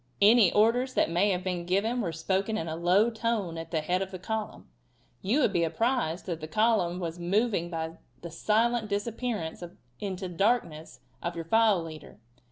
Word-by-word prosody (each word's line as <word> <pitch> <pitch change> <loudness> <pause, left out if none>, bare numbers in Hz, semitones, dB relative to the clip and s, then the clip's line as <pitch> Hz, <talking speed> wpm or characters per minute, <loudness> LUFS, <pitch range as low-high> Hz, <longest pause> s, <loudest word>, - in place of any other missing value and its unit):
Any 210 -2 +6
orders 245 +5 +2
that - - +2
may 180 +5 +3
have 185 -2 -1
been 180 -2 -2
given 220 +7 +1
were 175 -6 -2
spoken 190 +6 -1
in 165 - -3
a 160 - -3
low 185 +7 +3
tone 220 -6 -2
at 165 - -7
the 160 -3 -1
head 180 +4 0
of 190 - -3
the 190 - -7
column. 215 +4 -5 0.5
You 235 +11 +1
would 215 - +2
be 170 -2 +2
apprised 195 -1 0
that 170 -3 -4
the 155 - -5
column 185 -1 +1
was 170 -1 -4
moving 195 0 0
by 165 -1 -5 0.2
the 170 - -7
silent 220 +5 +1
disappearance 205 -4 -3 0.4
in 195 -2 -3
the 185 0 -5
darkness 170 - -1 0.2
of 170 0 -3
your 165 -1 -5
file 215 -2 +3
leader. 155 -7 -10
190 Hz, 185 wpm, -28 LUFS, 170-220 Hz, 0.5 s, Any